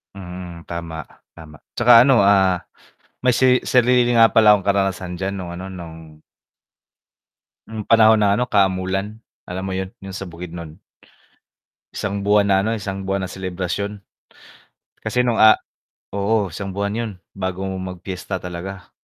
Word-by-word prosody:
Mm. 90 -2 -9
Tama, 85 -2 -6 0.3
tama 75 -2 -12 0.2
tsaka 120 -1 +7
ano, 125 -5 +5
ah, 95 -2 +4 0.7
may 125 -1 +3
seri 125 0 +4
sarili 125 -1 +3
nga 115 -1 +6
pala 105 -2 +6
akong 100 -3 -2
karanasan 95 -2 0
diyan 95 +2 -3
nung 90 -3 -6
ano, 90 +2 -7
nung 80 -4 -11 1.5
Yung 110 -1 -6
panahon 110 0 +5
na 100 0 +3
ano, 125 - 0
Kamulan 95 +1 0 0.3
alam 95 +1 -4
mo 95 - -3
yun, 95 0 -3
yung 95 -1 -9
sa 95 -1 -6
Bukidnon? 85 -1 -9 1.1
1 100 0 -3
buwan 105 0 +3
na 95 - +3
ano, 110 +3 -1
1 95 -1 -5
buwan 95 0 -2
na - - -8
selebrasyon. 95 +2 -4 1.0
Kasi 115 +3 +1
nung 120 -2 0
a 110 0 +8 0.6
oo, 100 0 0
1 95 +3 -6
buwan 100 +2 -2
yun 115 -2 -2 0.2
bago 95 -1 -4
mag-piyesta 95 0 -5
talaga. 90 +2 -7
95 Hz, 145 wpm, -21 LUFS, 90-105 Hz, 1.5 s, a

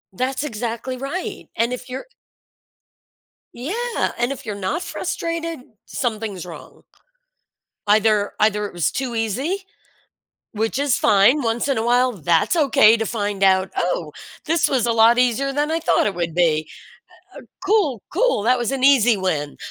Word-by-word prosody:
That's 260 +4 -2
exactly 235 0 -4
right. 275 +8 -5
And 235 +2 +1
if 250 +1 -7
you're 260 - -6 1.5
Yeah! 460 - -2
And 240 +3 0
if 270 - -7
you're 210 -2 -4
not 200 - -3
frustrated, 335 -3 -4 0.3
something's 215 -7 -4
wrong. 170 - -12 1.1
Either 210 0 +3
either 210 -1 +2
it - - -10
was 175 -3 0
too 255 -3 -3
easy, 240 - -1 0.9
which 220 +3 -2
is 285 -3 +1
fine. 215 +7 +4
Once 235 +3 -1
in 270 - +1
a 225 - -1
while, 250 +1 +3
that's 170 - +1
okay 230 -7 +5
to 225 - -2
find 205 -2 -3
out, 190 -1 +3
"Oh, 175 -3 -1 0.3
this 325 0 +2
was 255 -4 +1
a 235 - +1
lot 230 +1 +5
easier 250 +3 +1
than 295 +2 0
I 325 - 0
thought 330 - +2
it 200 - -2
would 170 -2 -3
be. 155 -3 +1 1.0
Cool, 375 - +1
cool. 485 - +1
That 250 +4 +3
was 240 +1 -2
an 270 -1 -3
easy 245 -5 +5
win." 160 -6 -2
235 Hz, 155 wpm, -21 LUFS, 205-275 Hz, 1.5 s, okay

